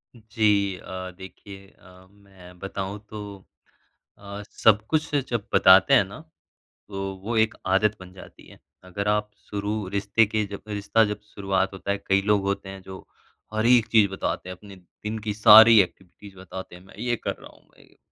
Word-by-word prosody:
जी 105 -4 0
अ, 95 0 -8
देखिए 95 +1 -12
अ, 90 0 -18
मैं 95 -3 -17
बताऊँ 95 +1 -5
तो 105 -2 -8 0.8
अ, 100 0 -9
सब 110 -2 +3
कुछ 155 -1 -1
जब 115 -2 -3
बताते 95 +7 +6
हैं 125 - +6
ना 100 +10 -11 0.7
तो 95 -1 -5
वो 115 +1 -2
एक 110 0 +2
आदत 100 +3 +2
बन 90 0 -12
जाती 95 - -15
है। - - -16 0.3
अगर 100 +3 -4
आप 105 0 0 0.2
शुरू 105 0 -3
रिश्ते 100 +3 +1
के 110 0 -1
जब 100 0 -9
रिश्ता 105 +2 +1
जब 105 -1 -4
शुरुआत 95 -1 -1
होता 95 +1 -6
है 100 - 0
कई 95 0 +3
लोग 105 -1 +1
होते 100 0 -3
हैं 95 0 -9
जो 95 0 -11 0.5
हर 110 +1 0
एक 120 -2 +5
चीज़ 110 -3 +4
बताते 95 -1 -4
हैं, 90 - -7
अपने 100 +1 -14
दिन 105 +4 -8
की 105 - -2
सारी 110 +1 +8
एक्टिविटीज़ 95 +1 -5
बताते 95 -1 -9
हैं। 90 - -16
मैं 95 - -18
ये 120 +1 -1
कर - - -4
रहा - - -14
हूँ, - - -23
मैं - - -22
ये - - -26
100 Hz, 185 wpm, -24 LUFS, 95-105 Hz, 0.8 s, सारी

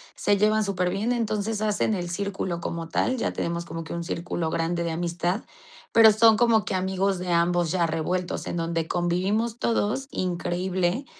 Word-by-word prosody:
se 205 - +2
llevan 215 +1 +3
superbién, 195 +3 -1
entonces 220 -2 -1
hacen 215 0 +1
el 175 -3 -3
círculo 190 -2 -3
como 165 -1 -4
tal, 255 +9 0
ya - - -1
tenemos 170 0 -3
como 165 0 -6
que 165 - -7
un 170 0 -3
círculo 170 -1 -3
grande 170 +1 -1
de 170 - -2
amistad, 175 +4 -1 0.5
pero 225 -1 +8
son 220 0 +5
como 230 -3 +4
que - - -3
amigos 190 0 0
de 180 -1 -3
ambos 170 -1 +2
ya 180 -2 +2
revueltos, 175 +3 -2
en - - -3
donde 165 -1 -1
convivimos 190 +7 0
todos 235 +3 0
increíble. 180 +5 -1
185 Hz, 170 wpm, -25 LUFS, 170-210 Hz, 0.5 s, pero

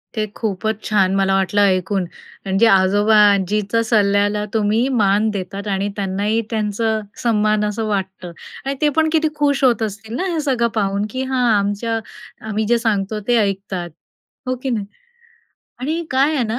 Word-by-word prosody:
ते 215 -1 0
खूपच 220 0 -3
छान 195 -3 +2
मला 195 0 +2
वाटलं 195 +2 +1
ऐकून 190 0 +1 0.4
म्हणजे 195 +4 +3
आजोबा-आजीच्या 205 +1 +3
सल्ल्याला 205 -1 +2
तुम्ही 220 +3 +1
मान 205 +2 +3
देतात 195 +1 -5
आणि 200 0 -1
त्यांनाही 205 +3 -1
त्यांचा 220 0 -1 0.2
सन्मान 215 -2 +2
असं 210 +1 -2
वाटतं. 190 -3 -3 0.3
आणि 275 +1 -2
ते 300 - +4
पण 315 0 +3
किती 315 -1 +3
खुश 285 -2 +1
होत 240 -4 +3
असतील 220 +2 -5
ना 360 - -2
हे 325 - -1
सगळं 255 -5 +1
पाहून, 200 -1 0
की 260 +4 -3
हां 260 -1 0
आमच्या 205 +3 -1 0.5
आम्ही 215 0 -1
जे 240 +1 +3
सांगतो 210 -2 -1
ते 240 -1 +3
ऐकतात. 195 -4 -2 0.6
हो 255 - 0
की 265 - -1
नाही? 215 -5 -1 0.9
आणि 315 +7 -2
काय 275 +4 +2
आहे 265 - +1
ना 225 +2 -2
210 Hz, 160 wpm, -19 LUFS, 200-230 Hz, 0.9 s, ते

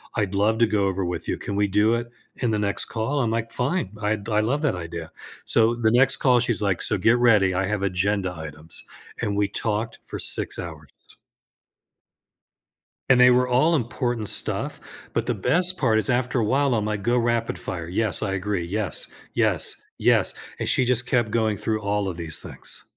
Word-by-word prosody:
I'd 105 -4 -1
love 105 +3 +2
to 115 - +4
go 100 -2 +1
over 95 0 -1
with 90 0 -4
you, - - -1
can 100 - -5
we 105 0 +2
do 105 +3 +3
it 120 0 -4 0.3
in 120 - -1
the 105 - +1
next 100 -1 0
call?" 120 +6 -2
I'm 120 -4 +1
like, 115 0 -2
"Fine, 130 - -1
I'd 105 0 -1
I 105 -1 +1
love 135 +8 0
that 145 - +2
idea," 85 -2 -7 0.3
so 115 0 +3
the 115 -2 +1
next 125 +3 +5
call 125 -2 +4
she's 120 -4 0
like, 100 -3 0
"So 105 - +3
get 115 +6 +3
ready, 105 -6 +4
I 95 +1 0
have 105 -2 -2
agenda 95 0 0
items," 80 0 -10 0.4
and 105 -3 -1
we 105 - +2
talked 110 +2 -3
for - - -6
6 - - +1
hours. 80 -3 -8 2.2
And 125 - +6
they 125 - +8
were 125 0 +3
all 130 +7 +3
important 120 -4 -2
stuff, - - 0 0.3
but - - -1
the - - 0
best 180 +1 +2
part 110 -6 +2
is 105 - -1
after 125 0 +1
a - - +1
while, 135 +4 +2
I'm 110 -3 0
like, 105 -2 -3
"Go 120 +2 +2
rapid 115 -1 -1
fire. 85 -2 -5
Yes, 105 +3 0
I 95 - -1
agree. 95 -2 -2
Yes, 100 -2 -3 0.2
yes, - - +1 0.2
yes." - - +3 0.3
And - - -2
she 125 - +2
just 120 -1 +2
kept 120 -3 +1
going 110 -1 +1
through 110 -1 -2
all 105 -1 -1
of 90 -3 -4
these 80 -4 -4
things. - - -8
110 Hz, 200 wpm, -24 LUFS, 100-120 Hz, 2.2 s, they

